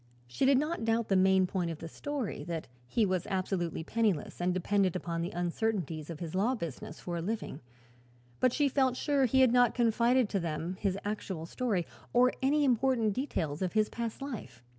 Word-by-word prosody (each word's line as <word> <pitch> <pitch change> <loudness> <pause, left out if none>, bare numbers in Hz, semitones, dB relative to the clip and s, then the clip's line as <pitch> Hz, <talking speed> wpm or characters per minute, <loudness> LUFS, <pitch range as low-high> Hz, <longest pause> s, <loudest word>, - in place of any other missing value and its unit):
She 125 - 0
did 275 -1 +6
not 300 -1 -1
doubt 225 0 +1
the 195 - +3
main 190 0 +5
point 180 -2 -2
of 165 - -4
the 165 - -7
story, 265 - -4
that 165 -2 -4 0.2
he 220 - +2
was 185 -2 -1
absolutely 185 -4 -2
penniless 205 -5 -1
and 180 +1 +2
dependent 185 0 +1
upon 170 -2 -2
the 170 - -2
uncertainties 175 -3 -2
of 165 -2 -6
his 165 -3 -5
law 215 +8 +2
business 160 - -6
for 175 -1 -4
a - - -2
living; 195 -5 -4 0.8
but 255 - +4
she 290 +3 +2
felt 260 -2 +2
sure 280 -2 +2
he 265 +2 +3
had 255 -2 +5
not 245 -2 +4
confided 240 +1 +3
to 200 - 0
them 170 +1 -3
his 195 -2 0
actual 195 -5 -3
history, 200 -2 -1 0.3
or 250 +1 +5
any 290 +3 +3
important 245 -4 +2
details 165 - -2
of 185 -2 -1
his 215 -1 +2
past 235 +3 -4
life. 130 - -7
200 Hz, 195 wpm, -31 LUFS, 170-245 Hz, 0.8 s, did